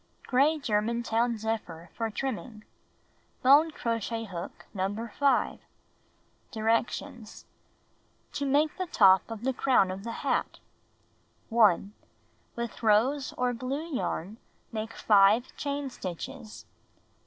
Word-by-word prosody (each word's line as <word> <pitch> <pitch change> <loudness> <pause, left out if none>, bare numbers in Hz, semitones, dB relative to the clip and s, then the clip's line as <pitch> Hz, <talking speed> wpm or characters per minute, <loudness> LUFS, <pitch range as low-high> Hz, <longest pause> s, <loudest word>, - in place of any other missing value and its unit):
Gray 280 +5 +3
Germantown 235 -1 0
zephyr 205 -7 -4
for 225 -1 -2
trimming. 225 -2 -5 0.8
Bone 285 +5 +6
crochet 230 -4 -3
hook 180 -5 -8
No. 205 +4 -3
5. 280 -2 +2 0.9
Directions: 230 +1 -2 0.9
To 280 - -3
Make 295 +3 +2
the 370 - -2
Top 190 - +5
of 225 -1 -7
the 265 +1 0
Crown 245 -8 +3
of 190 +1 -7
the 230 0 -6
Hat - - 0 0.9
1. 210 -3 +3 0.6
With 235 0 -5
rose 240 +6 +2
or 250 0 +1
blue 275 +7 -4
yarn 205 -3 -3 0.3
make 220 0 -4
5 210 +3 +4
chain 285 -1 -3
stitches. 190 +2 -7
230 Hz, 110 wpm, -28 LUFS, 210-265 Hz, 0.9 s, Bone